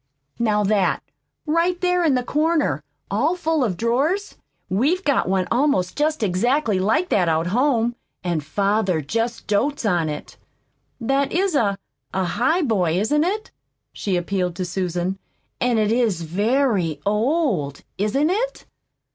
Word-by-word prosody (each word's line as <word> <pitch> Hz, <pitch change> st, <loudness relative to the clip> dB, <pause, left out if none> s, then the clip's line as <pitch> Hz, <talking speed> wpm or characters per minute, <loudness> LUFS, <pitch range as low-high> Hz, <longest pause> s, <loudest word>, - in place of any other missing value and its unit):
Now 210 Hz, -3 st, +2 dB
that, 200 Hz, -2 st, +1 dB, 0.4 s
right 335 Hz, +3 st, +1 dB
there 360 Hz, -1 st, +2 dB
in 300 Hz, -5 st, +3 dB
the 250 Hz, -, 0 dB
corner, 300 Hz, -, +1 dB, 0.3 s
all 280 Hz, -, +1 dB
full 325 Hz, -4 st, 0 dB
of 195 Hz, -8 st, -1 dB
drawers 280 Hz, -, 0 dB, 0.3 s
We've 285 Hz, -, +1 dB
got 280 Hz, -, +1 dB
one 190 Hz, -1 st, +1 dB
almost 240 Hz, -8 st, +1 dB
just 300 Hz, -3 st, 0 dB
exactly 215 Hz, +3 st, +1 dB
like 225 Hz, -, +1 dB
that 180 Hz, -4 st, +2 dB
out 160 Hz, +1 st, +1 dB
home, 240 Hz, +3 st, +1 dB, 0.3 s
and 170 Hz, -4 st, -1 dB
father 195 Hz, +1 st, +1 dB
just 230 Hz, -, -2 dB
dotes 245 Hz, +6 st, 0 dB
on 175 Hz, -6 st, +1 dB
it. 150 Hz, -1 st, -7 dB, 0.6 s
That 270 Hz, +3 st, 0 dB
IS 380 Hz, +1 st, +1 dB
a 205 Hz, -8 st, +2 dB, 0.4 s
a 190 Hz, -, +1 dB
highboy, 235 Hz, -, +1 dB
isn't 295 Hz, +9 st, +2 dB
it?" 415 Hz, +5 st, -2 dB, 0.4 s
she 195 Hz, -3 st, -2 dB
appealed 180 Hz, 0 st, -1 dB
to 185 Hz, 0 st, -3 dB
Susan. 180 Hz, +1 st, -2 dB, 0.4 s
"And 245 Hz, -2 st, +2 dB
it 215 Hz, -1 st, +2 dB
is 225 Hz, -8 st, +1 dB
very 200 Hz, -, +1 dB
old, 210 Hz, -, 0 dB, 0.2 s
isn't 270 Hz, -, +1 dB
it?" -, -, -2 dB
225 Hz, 140 wpm, -22 LUFS, 185-295 Hz, 0.6 s, in